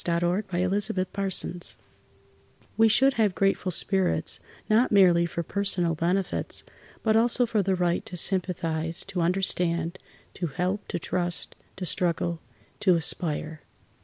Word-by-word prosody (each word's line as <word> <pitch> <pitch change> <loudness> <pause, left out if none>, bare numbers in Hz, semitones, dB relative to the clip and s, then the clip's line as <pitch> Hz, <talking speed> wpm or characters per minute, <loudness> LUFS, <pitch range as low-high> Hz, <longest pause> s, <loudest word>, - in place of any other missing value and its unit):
A - - -7
SONG 175 +2 +1
OF 185 +2 +1
THANKSGIVING 190 -2 -1 1.1
We 225 0 +5
should 265 +5 +4
have 210 -6 +1
grateful 195 -1 0
spirits, 190 +1 0 0.3
not 225 +3 +3
merely 175 -4 +5
for 170 0 -4
personal 180 -2 0
benefits, 180 +4 -2 0.4
but 220 -1 +2
also 240 +2 +3
for 220 -2 0
the 190 0 0
right 175 -1 0
to 180 - -4
sympathize, 165 -3 +1
to 195 -2 -4
understand, 175 -1 0 0.3
to 175 - -3
help, 180 +7 -3
to - - -3
trust, 175 0 -3 0.2
to 190 - -5
struggle, 170 0 -1 0.4
to 185 -3 +4
aspire. 160 -1 0
180 Hz, 135 wpm, -26 LUFS, 170-195 Hz, 1.1 s, We